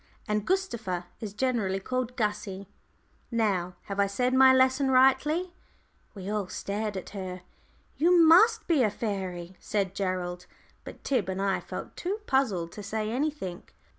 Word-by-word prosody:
And 210 0 -1
Gustava 235 - -1
is 210 -2 -6
generally 215 -6 0
called 250 +4 -3
'Gussie.' 210 -3 -2 0.6
Now, 195 -7 0
have 200 0 -5
I 200 - +4
said 250 +6 0
my 260 0 +7
lesson 260 +1 +3
rightly?" 270 +7 +3 0.6
We 190 -1 -7
all 205 -2 -1
stared 205 +1 -3
at 185 - -7
her. 185 -2 -6 0.5
"You 350 +4 +4
must 335 +8 +6
be 320 -6 +3
a 220 - +4
fairy," 190 -4 -4
said 195 -3 -1
Gerald. 180 -2 -3 0.4
But - - -11
Tib 245 -9 0
and 190 0 -3
I 195 -1 +1
felt - - -8
too 380 +4 -2
puzzled 205 - +1
to 210 - -8
say 215 +2 -3
anything. 260 - -2
210 Hz, 150 wpm, -28 LUFS, 190-260 Hz, 0.6 s, my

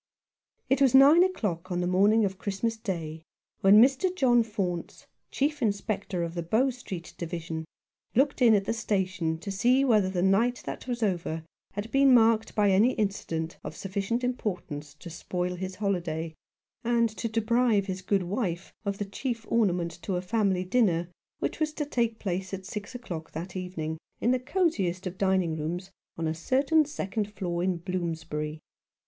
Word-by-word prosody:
It 270 +1 +2
was 265 -2 +5
nine 290 +6 +8
o'clock 190 - -2
on 175 - 0
the 180 - 0
morning 205 +5 +4
of 190 -1 -4
Christmas 205 +4 -1
Day 170 -8 -4 0.4
when 195 +2 +7
Mr. 270 +9 +4
John 245 -7 +4
Faunce, 195 -6 -3 0.2
Chief 295 +1 -1
Inspector 200 -4 -1
of 170 0 -4
the 170 - -3
Bow 225 +11 +2
Street 190 -9 -8
Division, 165 -1 -4 0.5
looked 275 +2 +2
in 230 -3 +7
at 195 -1 +1
the 225 - 0
station 190 -7 -1
to 195 +5 -6
see 250 +7 +3
whether 215 -7 +3
the 180 -2 -1
night 225 +6 +2
that - - -6
was 240 -2 -2
over 175 -5 -1 0.3
had 205 +3 -5
been 275 -1 +6
marked 225 -1 +3
by 205 -2 +4
any 215 +7 +4
incident 165 -6 -2
of - - -6
sufficient 200 +5 -2
importance 175 - -3
to 170 +2 -10
spoil 180 +1 -3
his 185 +1 -5
holiday, 170 -5 -2 0.5
and 235 0 +3
to 230 - -2
deprive 225 -1 +2
his 185 -1 -4
good 195 0 +1
wife 180 -2 -3
of 200 -1 -2
the 205 - -2
chief 225 +3 -4
ornament 180 -7 +2
to 190 - -2
a 180 - -1
family 195 -2 +1
dinner 180 -5 +1 0.3
which - - -3
was 310 -1 0
to 300 - -2
take 235 -5 0
place 190 -1 -3
at 190 0 -10
six 210 +4 -6
o'clock 175 -10 -7
that 175 +3 -6
evening 165 -4 -4 0.2
in 240 - +2
the 255 - +2
cosiest 245 - 0
of 185 0 -5
dining 190 -4 +2
rooms 175 +5 -4 0.3
on 165 -1 -1
a 160 - 0
certain 275 - +2
second 210 -7 -3
floor 175 -4 -3
in 185 -1 +1
Bloomsbury. 160 -4 -3
195 Hz, 175 wpm, -28 LUFS, 175-230 Hz, 0.5 s, nine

